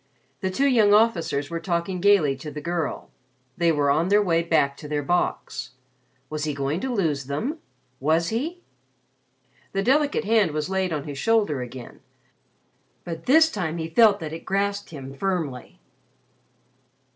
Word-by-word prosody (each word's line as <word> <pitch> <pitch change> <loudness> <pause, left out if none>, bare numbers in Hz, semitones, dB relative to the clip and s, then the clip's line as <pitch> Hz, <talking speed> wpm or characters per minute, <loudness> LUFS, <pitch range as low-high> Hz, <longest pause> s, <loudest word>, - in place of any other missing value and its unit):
The 190 - -1
two 270 +9 0
young 215 -6 +5
officers 170 -10 +1
were 165 - -2
talking 175 +1 -2
gaily 185 -9 +4
to 150 +3 -7
the 150 0 -7
girl. 170 +1 -3 0.4
They 170 -1 +2
were 145 -2 +2
on 160 +5 +2
their 205 +2 +4
way 170 -5 +2
back 160 -5 +1
to 150 - -9
their 145 -1 -2
box. 175 -4 -2 0.5
Was 155 +1 -4
he 150 -2 -2
going 140 +4 -1
to 265 +3 -3
lose 160 - 0
them? 225 - -3 0.4
Was 160 +4 +1
he? 315 +11 -3 1.1
The 195 - 0
delicate 285 +2 +2
hand 210 -7 +3
was 155 +3 -3
laid 190 -1 0
on 150 -3 -2
his 145 -2 -7
shoulder 205 - +1
again, 125 0 -9 1.0
but 165 -1 -7
this 320 +4 +6
time 170 -5 -3
he 160 0 -4
felt 210 +3 +5
that 155 -1 -5
it 165 - -7
grasped 200 +1 -1
him 135 -4 -8
firmly. 155 -7 -3
170 Hz, 160 wpm, -24 LUFS, 150-205 Hz, 1.1 s, this